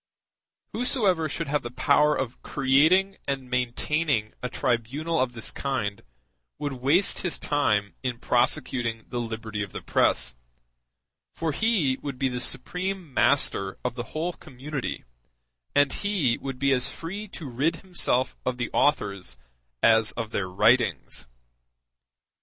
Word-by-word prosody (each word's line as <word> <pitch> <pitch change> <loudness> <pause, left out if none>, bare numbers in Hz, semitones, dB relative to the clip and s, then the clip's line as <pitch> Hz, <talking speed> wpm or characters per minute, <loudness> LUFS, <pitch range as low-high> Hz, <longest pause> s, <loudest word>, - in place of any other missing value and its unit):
Whosoever 205 - +2
should - - -3
have 150 +1 0
the 120 - -6
power 150 +4 +3
of 130 -2 -4
creating 160 +9 +3
and 135 -2 -3
maintaining 125 -1 0
a 125 - -3
tribunal 135 +9 -1
of 125 -1 0
this 115 -2 -3
kind 115 -8 -2 0.6
would 145 -1 -3
waste 140 +10 +3
his 180 -4 -1
time 105 -9 +1
in 125 -2 -2
prosecuting 120 -2 0
the 120 - -3
liberty 110 -2 -4
of 100 -2 -5
the - - -5
press; 65 - +2 1.0
for 165 -1 -1
he 165 - +1
would 140 -3 -5
be 135 0 +1
the 125 -1 -3
supreme 180 0 -3
master 100 -10 +2
of 125 - 0
the 120 -1 -5
whole 170 +3 -2
community, 135 0 -6 0.7
and 145 -1 +4
he 190 - +1
would 135 -2 -5
be 140 +1 +2
as 125 -2 +2
free 195 +6 -6
to 165 -6 -8
rid 135 +6 0
himself 175 -9 0
of 125 -1 -1
the 120 -1 -3
authors 100 - +1 0.5
as 110 -1 +5
of 115 -2 -4
their 95 -4 -2
writings. 110 - +2
130 Hz, 140 wpm, -26 LUFS, 120-155 Hz, 1.0 s, as